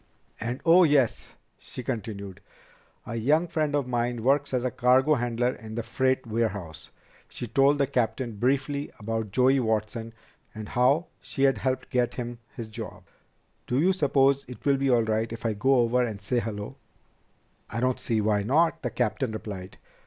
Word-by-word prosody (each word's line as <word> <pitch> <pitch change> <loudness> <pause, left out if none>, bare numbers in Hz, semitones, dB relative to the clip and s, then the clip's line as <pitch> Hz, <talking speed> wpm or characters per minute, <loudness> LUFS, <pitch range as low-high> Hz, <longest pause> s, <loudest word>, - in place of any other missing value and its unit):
"And 120 +4 -4
oh, 175 +2 +7
yes," 145 -7 +2 0.2
she 125 - -8
continued. 100 -5 -5 0.6
"A 120 - -5
young 150 +9 +2
friend 155 -3 -1
of 145 -2 +1
mine 120 -1 -1
works 140 +3 +2
as 125 -2 0
a 125 - 0
cargo 130 +4 +4
handler 120 -1 0
in 110 -2 -9
the 115 - -2
freight 130 +3 0
warehouse." 105 -8 -3 0.4
She - - -6
told 135 +5 +3
the 140 - +3
captain 115 -2 -1
briefly 140 +4 0
about 110 0 -3
Joey 130 +6 +3
Watson 110 0 -2 0.4
and 110 -1 -7
how 135 +7 +3 0.2
she 135 - -3
had 135 -5 +3
helped 130 +1 -2
get 125 -1 +1
him 120 -1 -5 0.2
his 115 -2 -6
job. 110 - -8 0.6
"Do 125 - +1
you 185 +5 +4
suppose 140 -4 +3
it 125 - -11
will 140 -1 +4
be 135 0 0
all 120 -2 +4
right 110 +1 -1
if 115 0 -7
I 110 - +1
go 130 +6 +2
over 125 0 +3
and 110 -5 -2
say 115 +5 0
hello?" 105 -3 -5 0.9
"I 115 - -3
don't 125 +1 +1
see 110 -2 0
why 105 -1 +2
not," 160 +9 +2
the 125 - -2
captain 115 +1 -1
replied. 100 -4 -7
120 Hz, 175 wpm, -27 LUFS, 110-135 Hz, 0.9 s, oh